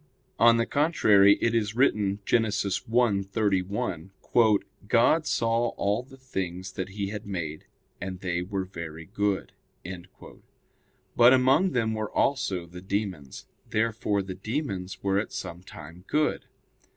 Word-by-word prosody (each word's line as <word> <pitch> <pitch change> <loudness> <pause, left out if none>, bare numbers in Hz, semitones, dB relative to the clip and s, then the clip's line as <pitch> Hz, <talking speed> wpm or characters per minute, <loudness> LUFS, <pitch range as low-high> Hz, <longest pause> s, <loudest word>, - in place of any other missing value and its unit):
On 115 0 +6
the 115 - +1
contrary, 105 -11 +4
It 115 - +2
is 110 -2 0
written 105 -6 +2
(Gen. 120 - +3
1:31): 100 -1 0 0.3
"God 135 +8 +3
saw 115 +1 +1
all 100 +3 0
the 135 +1 -16
things 95 -8 -5
that 95 0 -5
He 100 0 -4
had 105 0 -6
made, 80 -6 -5 0.4
and 95 0 -5
they 85 -2 -2
were 95 +1 -3
very 85 -3 -8
good." 100 +1 -1 1.6
But 120 +2 +7
among 135 +8 +4
them 115 -3 +1
were 110 -1 -3
also 95 -10 0
the 90 +1 -11
demons. 95 -8 -4 0.2
Therefore 110 -2 0
the 95 0 -6
demons 95 -2 -4
were 100 0 +2
at 105 - -4
some 85 +1 -6
time 85 -1 -12
good. 150 0 0
100 Hz, 130 wpm, -27 LUFS, 95-115 Hz, 1.6 s, But